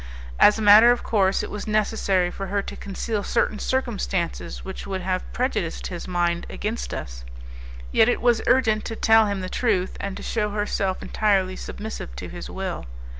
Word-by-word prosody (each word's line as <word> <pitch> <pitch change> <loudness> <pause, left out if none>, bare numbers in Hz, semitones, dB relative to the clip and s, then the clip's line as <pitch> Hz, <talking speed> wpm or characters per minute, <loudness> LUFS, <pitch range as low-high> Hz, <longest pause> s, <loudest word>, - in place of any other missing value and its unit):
As 210 - +7
a 220 - -2
matter 210 +3 +9
of 245 - 0
course, 195 -3 +2
it - - -6
was 210 - -6
necessary 205 -4 +1
for 195 +1 -6
her 200 +1 -1
to - - -7
conceal 205 +2 -3
certain 210 +1 0
circumstances 205 -9 -2
which 190 0 -7
would 190 -1 -3
have 185 0 -3
prejudiced 240 -9 -2
his 175 - -6
mind 175 -1 0
against 220 +3 -4
us; - - -6 0.7
yet 220 - +5
it - - +1
was 240 -2 +3
urgent 225 -5 +3
to 225 - -4
tell 225 -1 +5
him 200 -2 -2
the 185 - -4
truth 190 -3 0
and 200 -1 -4
to - - -8
shew 210 -2 -1
herself 205 -2 -2
entirely 195 -3 +1
submissive 205 - -7
to 60 - -7
his - - -8
will. - - -5
205 Hz, 180 wpm, -24 LUFS, 185-220 Hz, 0.7 s, matter